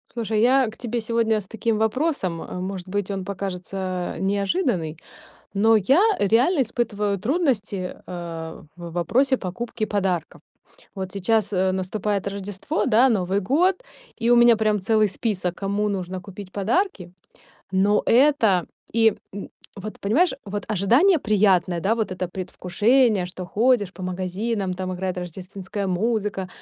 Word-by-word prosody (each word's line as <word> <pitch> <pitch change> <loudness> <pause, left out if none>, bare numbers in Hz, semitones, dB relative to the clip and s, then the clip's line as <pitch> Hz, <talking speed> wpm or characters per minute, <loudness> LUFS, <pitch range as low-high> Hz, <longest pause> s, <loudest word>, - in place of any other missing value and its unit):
Слушай, 220 -2 0
я 260 0 +4
к 215 - -9
тебе 240 -1 -3
сегодня 225 -1 +1
с 195 - -10
таким 225 -1 -1
вопросом, 220 - 0
э - - -8
может 185 -1 -5
быть, 205 +1 -2
он 195 -2 -3
покажется, 185 -1 -4
э, - - -7
неожиданный, 195 - 0 0.5
но 220 +3 +4
я 260 - +4 0.2
реально 250 - +3
испытываю 210 -4 -1
трудности, 215 - -1
э, 165 -2 -7
в 170 -1 -8
вопросе 260 - +2
покупки 215 +4 -4
подарков. 190 -6 -2 0.5
Вот 190 -2 -5
сейчас, 205 +1 +1
э, 185 0 +2
наступает 195 +1 -2
Рождество, 200 - -3
да, 245 +5 +5
Новый 195 -2 +1
год, 330 - +2 0.3
и 230 -1 -1
у 240 - +6
меня 240 -1 +7
прям 215 -1 +1
целый 215 +2 +3
список, 190 -4 -2
кому 200 +2 -1
нужно 185 -2 -4
купить 195 0 -10
подарки. 205 - -1 0.6
Но 200 +2 +3
это 230 - +4 0.3
и, 225 -2 +4 0.2
м, 200 - -7 0.3
вот 210 +2 -8
понимаешь, 270 - +2
вот 205 0 -4
ожидание 245 - +4
приятное, 195 - +2
да, 200 +6 +1
вот 220 -4 -2
это 185 0 -3
предвкушение, 205 +4 +1
что 185 +1 -7
ходишь 220 -1 +2
по 185 - -9
магазинам, 185 +2 -2
там 185 0 -4
играет 185 0 -3
рождественская 190 +3 -5
музыка, 200 0 -1
200 Hz, 145 wpm, -23 LUFS, 185-230 Hz, 0.6 s, меня